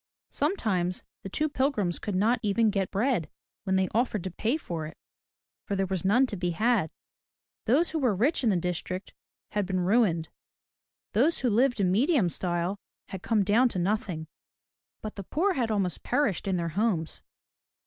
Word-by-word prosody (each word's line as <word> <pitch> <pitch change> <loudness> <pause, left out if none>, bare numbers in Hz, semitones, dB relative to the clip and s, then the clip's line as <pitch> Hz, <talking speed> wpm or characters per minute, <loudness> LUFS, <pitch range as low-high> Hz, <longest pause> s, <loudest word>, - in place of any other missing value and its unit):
Sometimes 200 - -1 0.2
the 195 - -7
two 305 +10 0
pilgrims 260 - 0
could 205 - -3
not 225 +6 +2
even 215 +1 +2
get 195 -3 -1
bread 215 - 0 0.4
when 190 -1 +1
they 190 0 +2
offered 220 -4 0
to 185 - -4
pay 230 - 0
for 165 - -5
it, 155 - -12 0.7
for 200 - -1
there 195 0 +1
was 190 -2 -3
none 225 +8 +4
to 240 - -5
be 180 -1 -1
had. 210 0 +1 0.8
Those 285 +10 +3
who 320 - -1
were 250 -8 +2
rich 260 - +1
in 235 - +3
the 200 - +3
district 180 +2 -3 0.4
had 205 -3 -1
been 185 -1 0
ruined; 180 -5 +2 0.8
those 285 +10 +3
who 250 -3 +2
lived 245 +2 +2
in 185 -2 +2
medium 240 - +3
style 175 +3 -1 0.3
had 190 - -6
come 215 -1 +2
down 225 +6 +4
to 190 - -5
nothing; 180 -3 -1 0.8
but 215 -1 -6
the 200 - -5
poor 370 - +1
had 245 -8 -1
almost 195 -5 -1
perished 225 - 0
in 190 - +1
their 170 -1 -1
homes. 175 -2 -1
205 Hz, 180 wpm, -28 LUFS, 180-240 Hz, 0.8 s, none